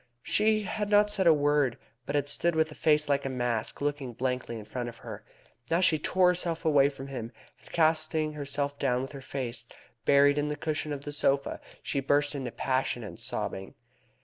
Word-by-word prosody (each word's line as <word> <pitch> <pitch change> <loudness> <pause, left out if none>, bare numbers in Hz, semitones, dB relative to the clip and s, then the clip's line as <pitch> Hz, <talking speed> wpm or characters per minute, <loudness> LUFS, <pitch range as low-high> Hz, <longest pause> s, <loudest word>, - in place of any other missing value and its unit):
She 215 0 +2
had 210 +1 -3
not 210 0 +5
said 190 -3 +2
a - - +9
word, 145 -4 +2 0.3
but - - -2
had 145 -1 +1
stood 170 +3 +1
with 160 0 +1
a - - -7
face 150 -1 +2
like 140 -1 +1
a 135 - -2
mask 120 -3 -2
looking 145 -3 -2
blankly 125 -1 -2
in 105 - -9
front 120 +2 -4
of 120 - -12
her. - - -7 0.5
Now 165 - +2
she 175 -4 +3
tore 180 +3 +3
herself 170 -2 -1
away 140 -3 +5
from 135 -1 -9
him, 120 -4 -5 0.3
and, - - -18
casting 155 -1 +1
herself 145 -1 -1
down 125 -2 +1
with 135 - -7
her 140 -2 -9
face 120 -3 -5 0.4
buried 145 +1 +5
in 145 - 0
the 150 - -2
cushion 155 0 -3
of 140 -1 -4
the 145 - -4
sofa, 140 -1 +1 0.2
she 140 - -1
burst 145 +2 +2
into 135 -3 -4
a - - -13
passion 130 -2 -1
of 105 - -9
sobbing. 105 -4 -4
145 Hz, 205 wpm, -29 LUFS, 130-155 Hz, 0.5 s, a